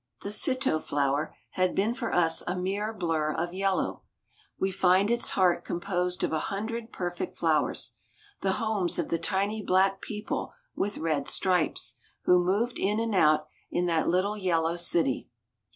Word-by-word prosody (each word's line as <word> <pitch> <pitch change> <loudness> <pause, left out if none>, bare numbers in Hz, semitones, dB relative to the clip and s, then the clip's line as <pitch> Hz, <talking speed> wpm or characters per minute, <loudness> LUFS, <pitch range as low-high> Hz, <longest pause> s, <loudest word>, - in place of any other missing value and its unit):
The 200 - -3
citto 210 -6 +2
flower 145 +2 -1 0.2
had 185 -1 0
been 210 +4 +2
for 240 -2 -3
us 165 -2 +3
a 180 - -1
mere 195 +4 -2
blur 165 -7 -1
of 170 +1 -2
yellow; 195 0 0 0.6
we 190 - +1
find 190 +3 +3
its 240 0 +2
heart 185 -2 +3
composed 180 0 -2
of - - 0
a 155 - +1
hundred 225 +3 -4
perfect 175 -1 -4
flowers, - - 0 0.4
the 190 -1 +1
homes 215 -5 0
of - - -2
the 165 - 0
tiny 200 +5 0
black 195 0 +2
people 210 0 -4 0.2
with 205 +1 -2
red 155 -3 -1
stripes, 160 -9 +1 0.3
who 180 0 +5
moved 210 +7 0
in 205 +3 +1
and 225 -1 -1
out 155 -4 +4 0.2
in 175 - 0
that 165 -2 +1
little 185 +4 +1
yellow 170 -3 +1
city. 170 -6 +1
185 Hz, 160 wpm, -28 LUFS, 170-205 Hz, 0.6 s, who